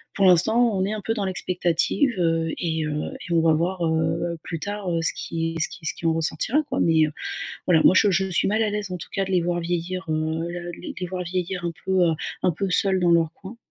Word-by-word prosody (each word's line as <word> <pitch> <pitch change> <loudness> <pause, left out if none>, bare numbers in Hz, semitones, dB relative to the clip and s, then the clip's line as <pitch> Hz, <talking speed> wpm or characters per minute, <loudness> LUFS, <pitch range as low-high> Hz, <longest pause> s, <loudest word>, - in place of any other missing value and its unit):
pour 195 - +3
l'instant, 220 +6 +4
on 190 - +1
est 210 - -2
un 215 - -4
peu 225 - -1
dans 205 -3 -2
l'expectative, 180 - +1
heu, 165 -1 +1
et 160 -2 -1
heu, 150 0 -2 0.3
et - - 0
on 165 - +4
va 160 -1 +4
voir, 175 +3 -1
heu, 165 +1 0
plus 165 -3 -5
tard, 200 -2 -4
heu, 165 - 0
ce 165 - +4
qui 165 0 -3
ce - - +2
qui 160 - -12
ce - - +1
qui 165 - -9
en 165 - +3
ressortira, 165 - +1
quoi. - - -1
Mais, 160 -2 +4
heu, 150 - -6 0.6
voilà, 165 -3 +4
moi - - +7
je 205 - +5
je 190 +1 +1
suis 175 - +2
mal 215 +2 +1
à 215 - +1
l'aise, 205 -1 -3
en 180 - -3
tout - - -8
cas, 195 - 0
de 190 - -7
les 180 - +3
voir 175 0 -1
vieillir, 175 +2 -3
heu, 160 +1 -1
le 175 0 -6 0.3
les 180 - -2
voir 180 0 -4
vieillir 180 0 -3
un 170 - -1
peu, 190 -2 +3
heu, 165 - +2 0.3
un - - +3
peu 195 +5 -2
seuls 190 0 +3
dans 175 -1 +3
leur 165 -1 +3
coin 200 +4 -11
175 Hz, 260 wpm, -24 LUFS, 165-190 Hz, 0.6 s, moi